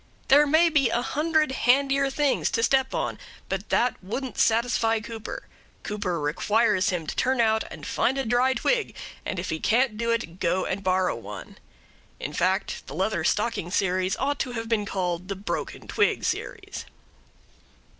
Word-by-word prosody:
There 290 +2 +7
may 320 +4 +5
be 285 -6 +3
a 240 +1 0
hundred 310 +1 +1
handier 275 +2 +3
things 285 0 +1
to 230 - 0
step 265 +1 +2
on, - - -2 0.3
but 195 +2 -3
that 245 -5 +1
wouldn't 250 +7 -4
satisfy 225 0 +2
Cooper. 220 0 -7 0.4
Cooper 200 -5 -2
requires 200 +7 +2
him 175 -4 -2
to - - -4
turn 260 0 +1
out 220 -1 +3
and - - -9
find 265 - 0
a 270 - -1
dry 245 +3 +2
twig; 480 - 0 0.3
and 185 - -3
if 175 +2 -3
he 160 - -2
can't 230 +2 +2
do 235 0 -1
it, 230 -7 -2
go 185 +2 +1
and 195 +1 -3
borrow 185 0 +1
one. - - -9 0.6
In 150 - -5
fact, 190 +5 -1
the 140 - -7
Leather 190 +5 0
Stocking 210 -5 0
Series 185 0 0
ought 285 +2 -1
to 250 - -2
have 225 -1 -4
been 215 -3 0
called 180 -2 -2
the 195 - -3
Broken 195 +2 -5
Twig - - +1
Series. - - -4
225 Hz, 170 wpm, -26 LUFS, 190-265 Hz, 0.6 s, There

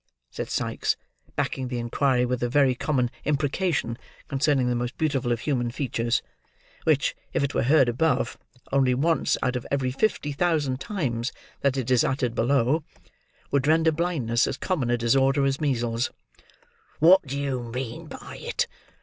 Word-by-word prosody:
said - - -5
Sikes; - - 0 0.4
backing 130 -1 -1
the 125 -1 -3
inquiry 125 +2 +1
with 125 0 -2
a 120 - 0
very 135 0 +4
common 125 -2 0
imprecation 145 -3 0 0.3
concerning 135 -2 +2
the 125 - +1
most 120 +1 -3
beautiful 135 -6 0
of 115 -1 0
human 125 -5 0
features: 120 -2 -1 0.6
which, - - +2 0.2
if - - +1
it 140 - -1
were - - +1
heard 135 +1 +5
above, 130 +3 +1 0.4
only 130 -2 +3
once 160 +5 +2
out 125 - 0
of 125 - -2
every 135 -2 0
fifty 150 0 0
thousand 145 -4 0
times 130 - -2 0.3
that 140 -1 +1
it 130 -1 -2
is 125 -2 +5
uttered 130 -3 0
below, 135 +5 +2 0.7
would 140 0 +1
render 160 +1 +4
blindness 150 -9 +1
as - - -3
common 150 -11 -1
a 120 - +2
disorder 135 +4 +3
as 135 +2 0
measles: 120 -4 0 0.9
"what 180 +5 +7
do 140 +1 -3
you 135 -3 -1
mean 120 0 -5
by - - -9
it? - - 0
135 Hz, 160 wpm, -26 LUFS, 120-145 Hz, 0.9 s, what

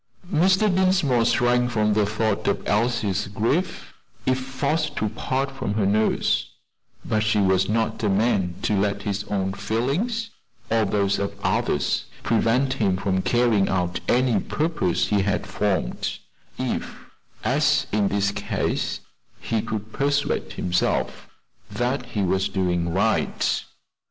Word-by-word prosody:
Mr. 185 +5 +4
Dinsmore 185 -11 +3
shrank 125 +1 +2
from 105 -2 +1
the 105 -1 +2
thought 110 0 -1
of 100 - 0
Elsie's 105 -3 +1
grief, 115 - -1 0.3
if 130 0 +2
forced 145 +4 -1
to 110 - -1
part 135 +5 -2
from 105 -6 -3
her 105 -3 +1
nurse; 105 +2 +1 0.6
but 110 - +1
he 110 0 +1
was 95 -1 +3
not 110 0 0
a 105 - +1
man 95 -3 +1
to 110 - +1
let 100 0 0
his 100 0 -2
own 95 -2 -1
feelings, 170 - -1 0.4
or 110 -1 +3
those 100 0 +1
of 100 0 -3
others, 70 - 0 0.2
prevent 125 +4 +2
him 100 -8 +1
from 95 -1 0
carrying 115 -3 +2
out 90 -2 0
any 125 -4 +3
purpose 150 - 0
he 105 -1 +3
had 100 +1 -1
formed, 100 -9 -1 0.4
if, - - -4 0.3
as - - +2
in 105 -1 +2
this 100 0 +1
case, - - -2 0.4
he 110 -2 -1
could 110 0 -5
persuade 140 +1 0
himself 90 0 -1 0.4
that 125 +1 -2
he 105 -5 -2
was 95 +1 +1
doing 90 -3 0
right. 100 +5 +1
110 Hz, 135 wpm, -24 LUFS, 100-125 Hz, 0.6 s, Mr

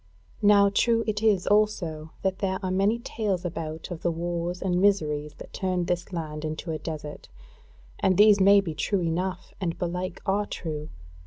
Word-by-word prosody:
Now 200 -1 +6
true 230 +2 +3
it 215 -1 -1
is 210 -5 +3
also 175 -7 +1
that 190 0 0
there 190 -2 0
are 185 - -1
many 195 +4 +2
tales 205 -6 -2
about 160 -1 -5
of 170 - -5
the 175 - +1
wars 170 +1 -3
and 180 -1 0
miseries 150 -7 +1
that - - -12
turned 185 -2 -1
this 180 +2 -2
land 155 -3 -5
into 155 +2 -4
a 155 - -3
desert, 150 -1 -7 0.7
and 185 -2 +2
these 210 -1 +7
may 200 +1 +7
be 170 -5 -4
true 185 +6 0
enough, 180 +2 -2
and 170 -2 -2
belike 180 0 -3
are 205 +1 +1
true. 155 -3 -5
180 Hz, 175 wpm, -26 LUFS, 165-200 Hz, 0.7 s, these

